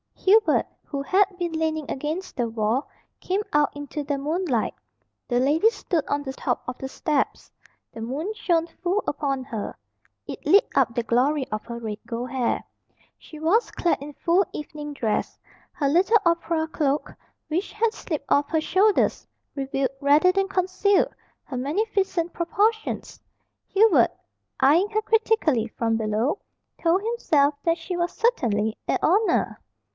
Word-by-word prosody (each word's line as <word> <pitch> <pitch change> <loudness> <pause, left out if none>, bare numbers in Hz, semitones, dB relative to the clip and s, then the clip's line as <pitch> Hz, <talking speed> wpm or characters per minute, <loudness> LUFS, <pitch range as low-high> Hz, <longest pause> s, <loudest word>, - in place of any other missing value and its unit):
Hubert, 425 +3 +4 0.2
who 280 -2 -4
had 390 +7 +4
been 350 -2 -2
leaning 315 -2 -2
against 310 +7 -4
the 240 -3 0
wall, 225 +4 0 0.3
came 380 +3 -1
out 295 -1 +2
into 290 +1 -5
the 285 0 -2
moonlight. 295 - -1 0.5
The 245 -1 +1
lady 300 - +4
stood 380 -7 -2
on 285 0 -1
the 265 -1 -5
top - - -2
of 250 - -4
the 265 - -4
steps. 295 +1 -1 0.4
The 225 - -8
moon 290 - -3
shone 340 -6 +1
full 365 +4 -2
upon 275 -3 -1
her. 225 -5 -5 0.5
It - - -8
lit 405 - +5
up 250 -4 +2
the 240 - 0
glory 260 +5 +1
of 215 0 -3
her 235 0 -6
red 215 -2 -5
gold 240 +2 -4
hair. 255 -3 0 0.6
She 310 - -12
was 360 +10 +2
clad 340 -5 0
in 290 +1 -8
full 350 +6 +2
evening 295 0 -6
dress. 225 -6 -1 0.3
Her 285 - -1
little 375 +9 +4
opera 335 -1 +1
cloak, 295 -2 -1 0.3
which 335 +5 -2
had 440 +1 +1
slipped 310 -10 -4
off 285 0 +3
her 320 -1 +1
shoulders, 390 +5 +2 0.3
revealed, 270 -1 -1
rather 295 +6 +5
than 390 +1 +1
concealed, 380 +1 +1 0.3
her 260 - -6
magnificent 355 - 0
proportions. 430 +6 -1 0.5
Hubert, 425 0 +4 0.5
eying 335 +9 +5
her 435 0 +1
critically 435 - +2
from 225 0 -1
below, 220 - 0 0.4
told 345 +3 +3
himself 310 -11 +2
that 335 0 +2
she 355 +2 -5
was 345 0 0
certainly 220 - +1
a - - +2
"oner!" 405 +6 +2
310 Hz, 150 wpm, -24 LUFS, 270-375 Hz, 0.6 s, lit